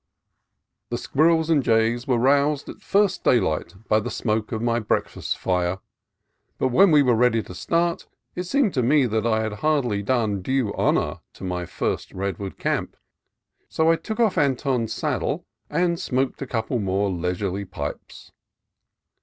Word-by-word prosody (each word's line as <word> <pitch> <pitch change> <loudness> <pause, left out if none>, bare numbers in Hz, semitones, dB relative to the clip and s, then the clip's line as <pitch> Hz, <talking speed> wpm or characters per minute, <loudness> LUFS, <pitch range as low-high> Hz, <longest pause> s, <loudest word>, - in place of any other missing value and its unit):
The - - -2
squirrels 160 +2 +2
and 150 -3 +4
jays 115 0 +1
were 125 -3 +2
aroused 140 +3 +2
at - - -10
first 200 -2 +1
day 125 - +5
light 85 -1 -2
by 110 - +3
the 105 - -4
smoke 110 -2 -2
of 110 - -2
my 120 0 +1
breakfast 110 - -2
fire; 90 0 0 0.8
but 130 - +1
when 190 +10 +5
we 150 -3 +6
were 125 -2 +3
ready 115 -1 +3
to - - -10
start, 170 - -1 0.3
it 180 - -4
seemed 235 +1 +1
to 130 - +1
me 135 +3 +4
that 110 -1 0
I 110 -1 +2
had 110 -1 -3
hardly 135 -10 +1
done 110 -3 0
due 130 0 0
honor - - 0
to - - -13
my 90 -2 -3
first - - -3
redwood 95 0 -4
camp, - - -2 0.7
so 160 +1 +3
I - - +4
took 220 +7 -6
off 225 -4 +3
Anton's 130 -4 0
saddle - - -2 0.2
and 170 +2 +1
smoked 130 +1 -1
a 135 - -4
couple 115 +1 -2
more 100 0 0
leisurely 90 +2 -2
pipes. 75 -5 -7
120 Hz, 165 wpm, -23 LUFS, 100-150 Hz, 0.8 s, we